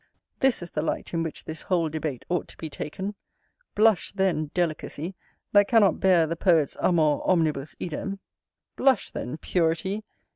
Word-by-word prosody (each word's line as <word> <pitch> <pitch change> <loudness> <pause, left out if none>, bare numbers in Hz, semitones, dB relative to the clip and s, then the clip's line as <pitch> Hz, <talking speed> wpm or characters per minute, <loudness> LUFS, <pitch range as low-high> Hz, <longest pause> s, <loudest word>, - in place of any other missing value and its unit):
This 265 -8 +3
is 175 - -8
the 150 - -1
light 160 - -3
in 165 - 0
which 165 -1 -5
this 160 +1 -4
whole 175 -3 +1
debate 155 -4 -4
ought 175 -1 -1
to - - -16
be 160 -2 -6
taken. 190 +9 -5 0.6
Blush, 215 -2 +3
then, 185 -6 0
Delicacy, 170 0 -2 0.4
that 205 -1 +5
cannot 220 -5 +4
bear 180 -4 +5
the 165 +1 -2
poet's 165 -5 +2
amor 155 -4 +3
omnibus 155 -6 +1
idem! 195 +4 -4 0.6
Blush, 265 -1 +2
then, 125 +6 -5
Purity! 180 +5 0
170 Hz, 155 wpm, -26 LUFS, 155-190 Hz, 0.6 s, that